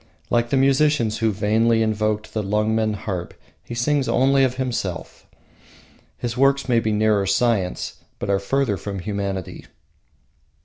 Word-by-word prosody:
Like 120 0 +2
the 135 - +1
musicians 135 -4 +2
who 110 -1 +2
vainly 110 +3 +2
invoked 110 0 -1
the 110 - -1
Lungmen 105 +1 0
harp, 95 -4 -5 0.3
he 120 - -7
sings 135 +3 +1
only 135 +1 +3
of 130 -1 +1
himself. 120 -9 -4 0.9
His 120 -1 -4
works 135 +1 +2
may 120 -2 +3
be 110 -1 -1
nearer 105 -2 +2
science, 100 -2 0 0.2
but - - -5
are 100 0 +2
further 120 0 0
from 100 +1 -5
humanity. 100 -1 -4
110 Hz, 140 wpm, -22 LUFS, 100-125 Hz, 0.9 s, only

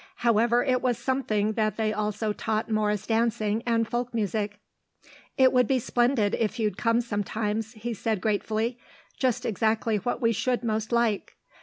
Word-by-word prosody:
However, 235 +1 +4
it 255 -2 +1
was 245 -3 +1
something 220 -6 0
that 215 -2 0
they 215 -1 0
also 210 0 -1
taught 220 +1 -2
morris 210 -2 0
dancing 225 -1 +1
and 230 -1 +2
folk 240 +1 -3
music. 205 -1 -2 0.8
"It 260 -1 +5
would 250 -2 +4
be 265 - +2
splendid 240 -3 +1
if 225 0 0
you'd 215 -2 0
come 230 0 +2
sometimes," 215 0 -2
he 235 +1 -4
said, 220 0 -1
gratefully. 220 +4 -1 0.4
"Just 250 -1 0
exactly 220 +1 +1
what 240 +4 -2
we 230 -2 +2
should 245 +3 0
most 220 -1 -1
like. 235 -3 0
225 Hz, 160 wpm, -26 LUFS, 215-240 Hz, 0.8 s, It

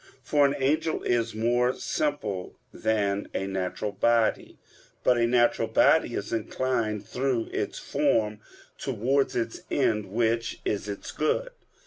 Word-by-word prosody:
For 145 +1 +4
an 140 - -1
angel 155 +4 0
is 115 -2 0
more 120 +3 +2
simple 110 -11 -2 0.2
than 105 -2 0
a 95 - -1
natural 95 +2 -3
body. 115 +3 +1 0.5
But 125 -1 +4
a 115 - +3
natural 120 -2 +3
body 120 +3 +4
is 100 - -4
inclined 115 -2 -1
through 125 +1 -1
its - - -2
form 105 -1 0 0.4
towards 135 +5 0
its 115 -1 -2
end, 105 -7 +1
which 115 +3 0
is 105 0 -2
its 100 - -6
good. - - 0
115 Hz, 130 wpm, -27 LUFS, 105-130 Hz, 0.5 s, For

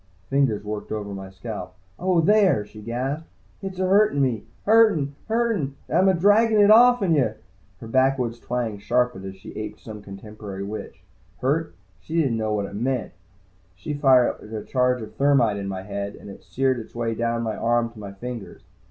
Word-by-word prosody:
Fingers 135 -7 +2
worked 105 0 -5
over 105 -2 -4
my 95 -1 -7
scalp. 95 -2 -7 0.2
"Oh, 180 -2 +2
there!" 190 - +4
she 105 +1 -13
gasped. 130 +8 -3 0.3
"Hit's 190 -2 -6
ahurtin' 190 -4 +3
me! 125 -6 0 0.2
Hurtin', 205 -10 +4
hurtin', 220 - 0
and - - -3
I'm 190 +1 +5
a 190 - +3
draggin' 215 +3 +4
it 205 0 +7
off'n 235 -5 +6
yuh!" 125 -8 +2 0.4
Her 115 - -9
backwoods 130 -1 +1
twang 120 -5 -3
sharpened 125 -2 0
as 95 0 -7
she 95 - -11
aped 110 0 -6
some 105 -2 -9
contemporary 100 0 -8
witch. 105 +2 -7 0.4
Hurt? 155 +5 0 0.2
She 160 - -2
didn't 130 -8 +1
know 110 -1 -1
what 100 -1 -1
it 100 - -9
meant. 120 +1 -2 0.6
She 120 - -5
fired 135 -4 +3
a 110 -2 -4
charge 125 -2 +1
of 110 - -10
thermite 135 -7 +3
in 100 -1 -4
my 95 -1 -4
head, 100 0 -5
and 100 - -11
it - - -12
seared 130 -1 0
its 110 - -11
way 115 -1 -1
down 115 +1 -1
my 110 -2 -2
arm 120 +1 +1
to 115 - -14
my 100 -2 -7
fingers. 115 -4 -8
120 Hz, 185 wpm, -24 LUFS, 105-150 Hz, 0.6 s, it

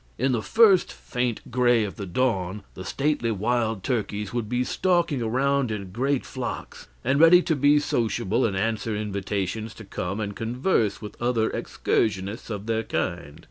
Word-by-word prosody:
In 130 +2 +1
the 120 -3 0
first 210 - +5
faint 125 -3 -3
gray 120 -2 +3
of 100 - -4
the 100 - -6
dawn 95 -2 -1
the 95 - -8
stately 140 +2 0
wild 110 -1 0
turkeys 105 -5 -2
would 120 -3 -2
be 125 +1 +1
stalking 170 -2 +1
around 135 +3 +1
in 100 -4 -5
great 130 +5 0
flocks, 130 -2 -6 0.2
and 135 +3 +2
ready 170 +2 +7
to 160 - +1
be 145 +1 +4
sociable 115 -4 0
and 100 -4 0
answer 110 +1 -1
invitations 105 +1 -3
to 110 - -10
come 95 +1 -4
and 100 -2 -3
converse 115 - 0
with 105 - -9
other 120 -2 +1
excursionists 105 +2 -1
of 105 -2 -5
their 115 0 0
kind. 85 -8 -3
115 Hz, 165 wpm, -25 LUFS, 105-130 Hz, 0.2 s, ready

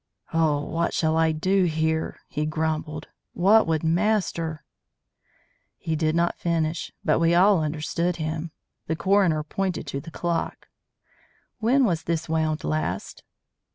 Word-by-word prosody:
"Oh, 155 -3 +2
what 165 +2 -1
shall 160 -1 +1
I 160 0 +3
do 185 +5 +2
here?" 160 -1 -1
he 150 +1 -2
grumbled. 155 0 -2 0.2
"What 200 +4 +4
would 160 -1 0
master 165 -3 0 0.6
" - - -38 0.3
He 160 - -2
did 155 0 0
not 170 0 +1
finish; 165 -1 -1
but - - +3
we 165 +1 +3
all 190 0 +5
understood 165 +3 -1
him. 160 0 -3 0.4
The 160 - 0
coroner 185 -4 +2
pointed 185 +3 -2
to 140 - -4
the 165 - -10
clock. 170 0 -3 0.9
"When 250 +4 +3
was 170 -7 -1
this 165 -1 -1
wound 160 -1 0
last?" 80 +5 -3
160 Hz, 140 wpm, -25 LUFS, 155-175 Hz, 0.9 s, all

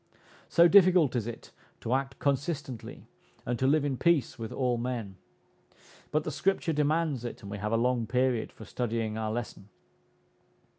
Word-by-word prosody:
So 170 0 +6
difficult 180 -7 +5
is 115 -2 -1
it 120 - -8 0.3
to 115 - -1
act 135 0 -1
consistently, 140 -3 -3 0.4
and 120 0 -2
to 130 - +2
live 145 +1 +3
in 135 -3 -1
peace 150 -6 +1
with 110 -1 -5
all 125 -3 0
men! 115 -6 -4 0.9
But 155 0 0
the - - -3
Scripture 190 -4 0
demands 150 -3 +1
it, 120 - -7
and 100 - -8
we 105 - -5
have 105 +1 -2
a 115 - +3
long 120 -1 +1
period 125 -1 0
for 110 - -12
studying 115 -2 -2
our 110 -1 -2
lesson. 110 -3 -5
125 Hz, 165 wpm, -29 LUFS, 115-150 Hz, 0.9 s, So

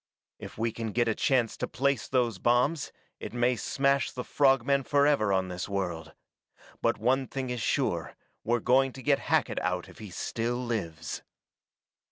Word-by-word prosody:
If - - -9
we 115 +1 0
can 110 -1 -5
get 120 -1 +2
a 110 - +2
chance 120 -1 +1
to - - -2
place 140 -1 0
those 120 -6 +1
bombs 125 - +2 0.3
it - - -7
may 120 +1 +2
smash 140 +2 +1
the 125 - -5
frog 135 -3 +3
men 140 0 +3
forever 140 -6 +3
on 95 -1 +1
this 90 +2 -5
world. 85 -5 -3 0.7
But - - +2
one 130 +4 +1
thing 130 -2 -4
is 125 -2 -3
sure: - - -1 0.3
we're 120 +1 +1
going 130 +2 +3
to 130 - -10
get 140 +2 +3
Hackett - - +1
out 90 0 -2
if - - -15
he 105 -2 -8
still 115 +6 -2
lives!" 95 -11 -4
120 Hz, 175 wpm, -29 LUFS, 105-135 Hz, 0.7 s, frog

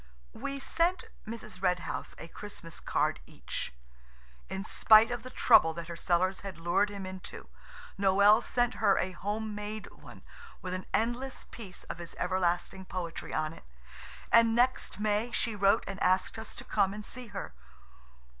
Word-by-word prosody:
We 275 0 -4
sent 340 +6 +1 0.2
Mrs. 215 -4 -7
Red 180 -2 +2
House - - -5
a 165 - -8
Christmas 175 -3 -8
card - - 0
each. - - -5 0.8
In 190 - -3
spite 220 +1 +6
of 240 -1 -3
the 255 - -8
trouble 160 -9 +5
that 170 0 -6
her 170 - -5
cellars 185 +2 +1
had 195 -4 -7
lured 175 +5 +2
him 200 -2 -6
into, 185 0 -8 0.5
Noël 200 +3 +6
sent 245 0 +1
her 195 - +5
a 185 - 0
home 210 +4 -3
made 210 +1 -5
one - - -14 0.4
with 185 -1 -5
an 185 0 -4
endless 240 +4 -1
piece 200 -6 -9
of - - -7
his 170 -1 -7
everlasting 180 0 0
poetry 180 -3 -5
on 155 0 -1
it, - - -14 0.7
and 230 -1 +6
next 245 -4 +1
May 210 +2 +1
she 230 -1 0
wrote 200 0 +4
and 195 - -6
asked 185 +4 +2
us 220 - -8
to - - -7
come 195 +1 +1
and 210 0 -7
see 250 -1 -6
her. - - -6
200 Hz, 165 wpm, -31 LUFS, 185-225 Hz, 0.8 s, spite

